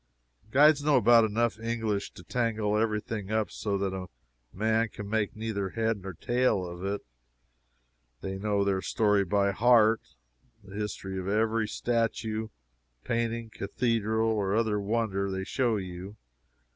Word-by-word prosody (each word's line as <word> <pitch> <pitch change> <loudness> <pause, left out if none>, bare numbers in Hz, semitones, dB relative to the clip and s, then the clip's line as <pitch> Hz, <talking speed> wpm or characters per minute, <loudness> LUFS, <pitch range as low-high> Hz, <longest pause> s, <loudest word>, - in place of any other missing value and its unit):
Guides 145 +3 +5
know 150 -1 +4
about 115 +1 +6
enough 110 +1 0
English 110 -3 -2
to - - -12
tangle 110 -3 0
every 110 -1 +1
thing 105 -2 -5
up 110 -1 0
so 100 -2 -2
that 95 -1 -1
a 95 -1 -5 0.4
man 110 +4 +1
can 105 -1 -8
make 105 -1 -1
neither 105 -3 -3
head 110 0 -1
or 95 -2 -6
tail 120 -3 +1
of 85 +1 -8
it. 100 +1 -2 1.2
They 95 0 -4
know 100 0 +1
their 95 -1 0
story 105 -2 +2
by 100 +1 +2
heart 115 +1 +4 0.6
the 100 0 -12
history 100 -2 -4
of 95 - -5
every 110 +2 +1
statue, 115 -1 -1 0.6
painting, 115 -1 -2
cathedral 110 +1 0
or 100 -2 0
other 110 -2 +1
wonder 100 -2 -1
they 95 0 -3
show 120 +1 0
you. 95 +1 -7
110 Hz, 145 wpm, -28 LUFS, 100-115 Hz, 1.2 s, about